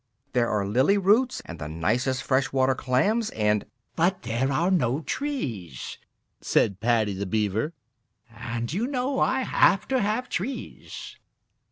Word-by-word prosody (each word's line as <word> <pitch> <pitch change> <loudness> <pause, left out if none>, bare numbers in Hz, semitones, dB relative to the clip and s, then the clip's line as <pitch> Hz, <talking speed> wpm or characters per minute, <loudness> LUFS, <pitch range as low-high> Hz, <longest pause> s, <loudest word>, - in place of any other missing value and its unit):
"There 120 -2 +2
are 105 -2 0
lily 130 - +3
roots 215 +7 +3
and 85 - -8
the 75 - -5
nicest 115 - 0
fresh 135 0 +1
water 130 0 +3
clams 205 - +1
and 105 - 0
" - - -47
"But 180 +3 +1
there 120 +4 0
are 170 +7 +1
no 140 -5 +2
trees," 120 - -4 0.4
said 100 -3 +2
Paddy 110 -2 +2
the 100 +1 -4
Beaver, 110 - 0 0.6
"and 115 +2 -4
you 220 +7 0
know 265 0 -1
I 260 0 +2
have 195 -5 +3
to 265 -1 +2
have 215 +5 0
trees." 210 - -5
130 Hz, 150 wpm, -26 LUFS, -, 0.6 s, lily